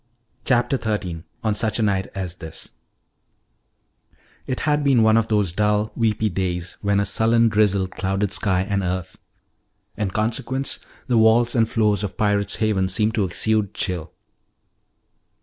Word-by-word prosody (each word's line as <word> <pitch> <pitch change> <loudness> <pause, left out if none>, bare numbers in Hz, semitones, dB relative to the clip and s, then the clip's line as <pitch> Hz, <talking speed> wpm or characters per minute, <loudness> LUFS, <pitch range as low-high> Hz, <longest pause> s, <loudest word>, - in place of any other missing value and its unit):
CHAPTER 125 +1 +2
XIII 95 -7 -3 0.2
ON 110 -2 +1
SUCH 110 +1 0
A 115 - +1
NIGHT 95 -2 0
AS 90 -2 -4
THIS 80 -2 -9 1.8
It 130 - -3
had 150 -1 +1
been 130 -5 +4
on 110 0 +5
of 115 -1 +2
those 105 -5 +1
dull, 105 +3 +1
weepy 110 -1 +1
days 90 -2 -3
when 100 -1 +1
a 100 - +1
sullen 115 +2 +3
drizzle 105 -3 +2
clouded 95 +2 -2
sky 95 -1 +1
and 100 +1 -1
earth. 90 -1 -4 0.8
In 105 -3 -1
consequence, 115 +6 -2 0.3
the 120 -3 +2
walls 115 +2 +4
and 115 -2 +2
floors 105 -2 +1
of 95 -3 -5
Pirate's 105 -1 +1
Haven 100 -4 0
seemed 105 +3 +1
to 110 -4 +1
exude 105 +3 0
chill. 90 -4 -3
105 Hz, 150 wpm, -22 LUFS, 95-110 Hz, 1.8 s, on